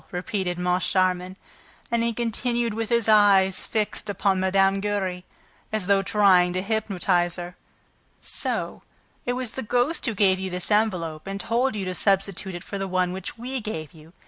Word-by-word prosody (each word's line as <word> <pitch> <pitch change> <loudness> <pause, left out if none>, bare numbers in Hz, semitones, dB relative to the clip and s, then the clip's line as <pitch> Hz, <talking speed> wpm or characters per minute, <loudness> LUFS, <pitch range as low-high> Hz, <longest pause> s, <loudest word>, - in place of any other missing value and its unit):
repeated 180 0 -3
Moncharmin. 180 +1 0 0.5
And 235 -1 +2
he 235 0 +1
continued 235 0 -1
with 225 0 -3
his 235 -2 +2
eyes 200 -3 +5
fixed 215 -1 -2
upon 195 -1 +1
Mme. 195 +1 +3
Giry, 195 -3 -2 0.5
as 215 -4 -1
though 200 0 +3
trying 190 -3 +4
to 185 - -1
hypnotize 195 -5 0
her. 175 0 -7 0.6
"So - - -3 0.5
it 245 - +1
was 250 -2 -3
the 265 - -5
ghost 245 +7 +1
who 225 - -1
gave 190 -2 +3
you 190 0 -3
this 180 +3 -3
envelope 180 -7 0
and 195 0 -4
told 240 +3 0
you 200 -2 -3
to 185 - -3
substitute 195 -1 0
it 175 - -7
for 200 - -6
the 195 - -2
one 185 -1 0
which 190 +4 -6
we 255 +2 -4
gave 160 -9 -6
you? 160 +1 -16
195 Hz, 170 wpm, -24 LUFS, 180-220 Hz, 0.6 s, eyes